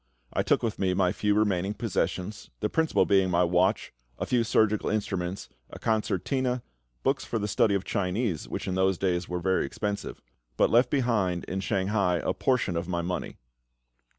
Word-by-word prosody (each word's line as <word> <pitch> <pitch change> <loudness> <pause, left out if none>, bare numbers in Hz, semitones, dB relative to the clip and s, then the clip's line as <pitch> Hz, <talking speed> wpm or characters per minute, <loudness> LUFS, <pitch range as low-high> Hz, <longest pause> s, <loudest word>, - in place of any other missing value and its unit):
I - - +1
took - - +2
with 115 -3 -2
me 95 -2 +1
my 90 -1 +2
few 105 +1 +1
remaining 100 -1 +1
possessions, 100 -2 -2
the 105 - -1
principal 160 +5 +2
being 95 -2 +3
my 90 0 +3
watch, 90 +4 +1 0.2
a - - -2
few 120 -2 +2
surgical 110 -2 +2
instruments, 95 -3 -2 0.2
a - - -9
concertina, 125 +3 0 0.4
books 135 0 +1
for 115 - -3
the 105 -1 -2
study 105 0 +2
of 95 - -1
Chinese, 95 -1 -1
which - - -4
in 95 - -1
those 95 0 +2
days 90 -2 -1
were 90 - -2
very 95 +2 +1
expensive; 100 +8 -4 0.4
but - - +3
left 120 +2 +5
behind 105 - +1
in 95 - -4
Shanghai 95 -1 +1
a - - 0
portion 125 -9 0
of 85 +1 -2
my 85 -2 -1
money. 90 +1 -4
100 Hz, 180 wpm, -27 LUFS, 90-110 Hz, 0.4 s, left